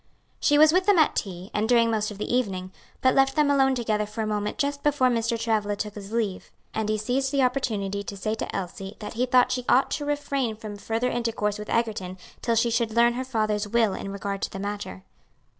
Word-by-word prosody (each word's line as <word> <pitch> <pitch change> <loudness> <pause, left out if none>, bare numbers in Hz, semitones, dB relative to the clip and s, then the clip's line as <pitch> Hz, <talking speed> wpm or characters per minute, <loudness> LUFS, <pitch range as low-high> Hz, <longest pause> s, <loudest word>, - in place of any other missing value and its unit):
She 290 - +3
was 310 +1 +7
with 370 +2 +2
them 405 -3 +5
at 315 - +4
tea, 185 -1 -4
and 215 +2 0
during 230 -2 +4
most 215 -1 0
of 210 - -8
the 210 - -3
evening, 190 -7 -1 0.3
but 260 - +4
left 270 0 +3
them 295 -1 +3
alone 270 -1 +3
together 215 -3 -1
for 215 +1 -4
a - - -1
moment 210 -1 -2
just 285 -1 -1
before 285 -3 +3
Mr. 230 -1 0
Travilla 215 -3 0
took 210 0 -4
his 205 -1 -9
leave, 220 -5 -2 0.2
and 220 -1 -1
he 215 - +1
seized 260 +5 -1
the 275 -2 +2
opportunity 210 -6 -1
to 200 - -6
say 215 +2 -2
to 220 - -4
Elsie 195 +2 -5
that 210 - -7
he 245 +3 0
thought 250 0 +4
she 250 0 -1
ought 260 - +4
to 295 - -2
refrain 280 -5 -1
from 215 -1 -8
further 225 +4 -1
intercourse 220 -3 -1
with 210 - -7
Egerton 210 -6 -1 0.2
till 230 - +1
she 230 +1 +2
should 230 -1 +1
learn 235 0 +5
her 255 +2 -3
father's 215 -4 -1
will 225 -2 +2
in 195 - -5
regard 200 0 -4
to - - -1
the - - -7
matter. 200 -1 -5
225 Hz, 230 wpm, -25 LUFS, 210-255 Hz, 0.3 s, was